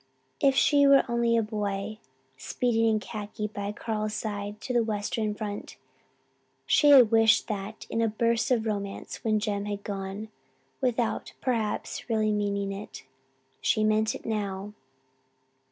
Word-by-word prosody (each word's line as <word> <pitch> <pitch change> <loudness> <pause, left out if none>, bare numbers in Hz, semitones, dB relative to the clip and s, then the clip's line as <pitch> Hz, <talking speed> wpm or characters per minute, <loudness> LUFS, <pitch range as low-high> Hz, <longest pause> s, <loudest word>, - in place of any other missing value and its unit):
If 275 -1 +4
she 285 0 +5
were 275 0 +7
only 235 -1 +2
a 225 - +2
boy, 210 0 -3 0.4
speeding 225 - 0
in 220 -1 +2
khaki 210 0 -6
by 205 -1 -4
Carl's 215 0 -3
side 205 -1 -4
to 250 - -4
the 240 -1 +3
Western 215 0 -2
front! 210 -1 -6 0.9
She 295 - +4
had 255 -6 +8
wished 225 -1 +4
that 210 +1 -5
in 230 - -1
a 225 - +3
burst 230 +2 +1
of 235 -3 +2
romance 200 -2 -4
when 215 -1 +2
Jem 205 -1 -2
had 205 -1 -4
gone, 200 +1 -5 0.5
without, 245 -3 -1
perhaps, 230 -1 -2
really 215 -1 +2
meaning 200 -1 -1
it. 200 +2 -8 0.6
She 215 - +2
meant 215 +1 +2
it - - -10
now. 205 -2 -3
215 Hz, 145 wpm, -27 LUFS, 205-230 Hz, 0.9 s, had